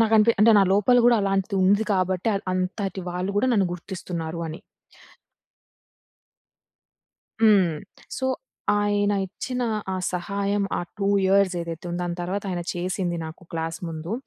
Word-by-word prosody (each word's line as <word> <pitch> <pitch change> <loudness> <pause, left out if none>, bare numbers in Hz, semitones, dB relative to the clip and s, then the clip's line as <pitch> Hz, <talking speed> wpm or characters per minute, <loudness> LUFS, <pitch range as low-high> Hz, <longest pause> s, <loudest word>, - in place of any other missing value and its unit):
నాకనిపి 225 0 +5
అంటే 230 - +7
నా - - +6
లోపల 210 +5 +4
గూడా 240 -1 +6
అలాంటిది 195 +1 0
ఉంది 200 +3 +4
కాబట్టి 185 +2 0
ఆద్ 195 - -3
అంతటి 190 +1 -2
వాళ్ళు 180 +2 -2
గూడా 225 - +3
నన్ను 200 -5 +3
గుర్తిస్తున్నారు 170 -2 -5
అని. 160 +5 -7 2.8
హ్మ్. 195 -7 +5 0.4
సో, 260 - -1 0.5
ఆయన 205 0 +1
ఇచ్చిన 250 +6 -4 0.3
ఆ - - -1 0.2
సహాయం, 200 +3 -1 0.2
ఆ - - -1 0.2
2 200 - 0 0.2
ఇయర్స్ 190 -1 +3
ఏదైతే 170 +1 -6
ఉందో 175 - -3
దాని 175 0 -3
తర్వాత 190 +3 -2
ఆయన 175 -1 -2
చేసింది 180 -1 -2
నాకు 160 +3 -9
క్లాస్ 165 0 -3
ముందు, 165 +4 -5
190 Hz, 140 wpm, -24 LUFS, 175-205 Hz, 2.8 s, అంటే